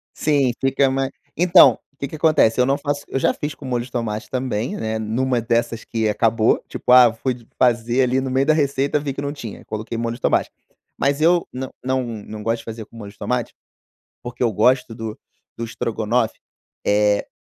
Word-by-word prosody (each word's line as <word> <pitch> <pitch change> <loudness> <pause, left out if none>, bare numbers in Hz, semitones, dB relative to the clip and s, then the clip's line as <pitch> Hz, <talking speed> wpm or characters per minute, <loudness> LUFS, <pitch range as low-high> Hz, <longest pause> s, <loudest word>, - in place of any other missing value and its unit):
Sim, 145 -4 +2
fica 135 0 +2
ma 135 0 -1 0.3
então, 175 +1 +6
o - - -38
que 140 - -4
que 155 - -7
acontece, 150 -7 +3
eu 125 - +4
não 135 +1 +2
faço 145 -1 -3
eu 135 - -1
já - - +2
fiz 150 0 -5
com - - -14
molho 125 -2 -1
de 125 - -13
tomate 115 -2 -3
também, 125 -3 -2
né, 110 0 -2
numa 120 +3 0
dessas 115 0 -1
que 110 -1 -1
acabou, 110 +1 +2
tipo, - - -4
ah 125 0 +9
eu 115 - +1
fui 125 +3 -2
de 120 -2 -16
fazer 120 +1 +2
ali 130 +1 +2
no 135 0 -3
meio 135 +1 +1
da 155 - +4
receita 140 -1 +1
vi 145 -2 -3
que 140 - -5
não 140 0 -3
tinha, 120 -8 -8
coloquei 110 +2 -5
molho 115 0 -2
de - - -18
tomate, - - +1 0.5
mas 140 +1 +1
eu 170 +2 +3
não 130 0 -5
não 130 0 0
não 110 -2 -7
gosto 115 +2 0
de - - -14
fazer 110 -1 -7
com - - -17
molho 100 -3 -9
de 100 - -27
tomate, 125 -2 -2 0.7
porque 120 +1 -6
eu 115 -2 +2
gosto 125 +3 +2
do 110 -1 -6 0.4
do 115 - -4
estrogonofe, 115 0 -1 0.5
eh, 105 0 +2
125 Hz, 215 wpm, -21 LUFS, 115-135 Hz, 0.7 s, ah